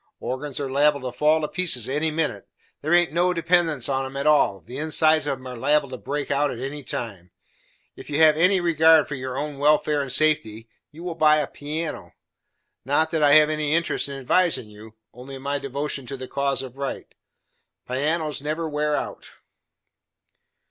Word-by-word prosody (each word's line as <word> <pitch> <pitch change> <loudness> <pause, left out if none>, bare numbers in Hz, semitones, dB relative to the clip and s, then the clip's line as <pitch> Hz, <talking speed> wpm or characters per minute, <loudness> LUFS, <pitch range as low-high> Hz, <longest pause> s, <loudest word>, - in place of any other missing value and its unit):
Organs 135 +2 -5
are 140 - -2
liable 145 +1 +2
to 125 -1 -6
fall 155 +1 +3
to 150 - -1
pieces 155 - +1
any 150 +4 0
minute. 155 0 -3 0.3
There 155 - -3
haint 175 -3 +2
no 180 +2 +1
dependence 165 -5 +1
on 135 -1 -1
'em 135 +1 -7
at 140 - -3
all, 145 -10 +3
the 125 - -9
insides 155 0 +2
of 135 - -1
'em 130 - -15
are 125 -1 -7
liable 140 +3 +1
to 130 - -6
break 145 +3 -4
out 145 +1 +1
at 120 - -5
any 135 +4 -6
time. 105 -8 -6 0.7
If - - -12
you 145 - -2
have 155 -1 +6
any 180 +4 +3
regard 160 -2 +4
for - - -6
your 130 -1 -5
own 145 -1 -4
welfare 150 0 +2
and 135 -2 -4
safety, 115 -8 +1 0.2
you 160 +3 -12
will 180 -1 -4
buy 155 -2 +4
a 150 - 0
piano. 155 +4 -6 0.7
Not 150 +4 +1
that 160 -2 0
I 145 -1 +5
have 155 0 +6
any 155 0 0
interest 170 -3 0
in 140 - -6
advising 135 -4 0
you, 110 +1 -14 0.2
only 130 +3 -10
my 140 +2 -3
devotion 140 -1 -4
to 135 - -4
the 130 0 -7
cause 140 0 -1
of 130 0 -10
Right; 140 -1 -5 0.7
pianos 150 +3 -1
never 155 +3 -3
wear 150 0 -1
out." - - -5
145 Hz, 190 wpm, -23 LUFS, 135-155 Hz, 0.7 s, have